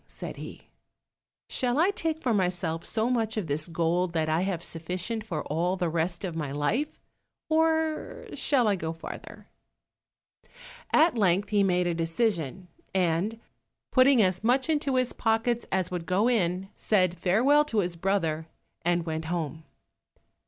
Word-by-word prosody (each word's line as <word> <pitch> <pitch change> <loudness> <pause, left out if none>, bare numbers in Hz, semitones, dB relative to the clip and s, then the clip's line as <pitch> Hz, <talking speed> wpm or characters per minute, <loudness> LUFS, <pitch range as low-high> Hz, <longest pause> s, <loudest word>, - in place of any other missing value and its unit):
said - - -7
he; - - -9 0.8
"shall 250 -1 0
I 345 +6 +4
take 325 -4 -3
for 245 - +2
myself 180 -4 0
so 225 0 0
much 225 -3 0
of 210 - -1
this 150 +1 -1
gold, 170 +1 0
that 160 -2 0
I 160 +2 +2
have 185 -3 -2
sufficient 180 +8 -4
for 170 -8 -4
all 170 +5 0
the 175 -2 0
rest 170 +3 -1
of 175 -3 -4
my 150 -4 -3
life, 150 - -1 0.5
or 320 0 +1
shall 255 -6 +2
I 205 - +3
go 160 -3 -3
farther?" 165 - -9 1.5
At 320 -2 +5
length 195 0 +2
he 210 -1 +3
made 180 -2 +2
a 175 - +1
decision, 170 - -1 0.3
and 185 +5 +1 0.5
putting 255 -3 +6
as 185 +1 +1
much 255 +5 +2
into 290 -3 0
his 255 -1 +1
pockets 225 +1 0
as 185 -1 0
would 175 -2 -4
go 195 +5 +2
in, 190 -5 +1
said 185 -4 +1
farewell 250 - +4
to 225 -8 +1
his 175 -2 -3
brother, 165 -3 -1 0.4
and 175 0 +1
went 160 -1 -3
home. 160 -2 -3
185 Hz, 155 wpm, -27 LUFS, 165-235 Hz, 1.5 s, putting